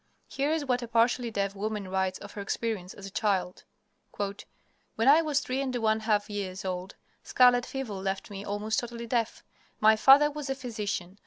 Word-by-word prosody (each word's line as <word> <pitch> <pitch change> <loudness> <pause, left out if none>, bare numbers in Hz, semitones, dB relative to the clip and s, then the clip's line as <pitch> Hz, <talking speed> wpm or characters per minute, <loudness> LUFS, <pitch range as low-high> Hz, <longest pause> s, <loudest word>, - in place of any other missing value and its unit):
Here 280 +2 -1
is 315 -2 0
what 250 -2 0
a 240 - -5
partially 235 +1 +2
deaf 200 -2 -1
woman 210 0 -3
writes 190 0 -1
of 205 - -10
her 205 - -6
experience 200 -2 -3
as 200 - -10
a 195 - -8
child: 185 -3 -1 0.5
"When 205 +3 -5
I 300 +4 +8
was 300 -3 0
three 260 +1 -2
and 260 -2 -2
one 220 -2 +1
half 215 -2 +1
years 195 -3 -5
old 185 +1 -4 0.3
scarlet 245 -1 +4
fever 270 -5 -4
left 195 +1 -4
me 200 0 -6
almost 210 +2 -1
totally 235 -1 -6
deaf. 230 -1 -1 0.4
My 220 0 +6
father 275 +6 +6
was 295 -2 -6
a 270 - 0
physician. 210 -7 -4
220 Hz, 185 wpm, -28 LUFS, 200-250 Hz, 0.5 s, I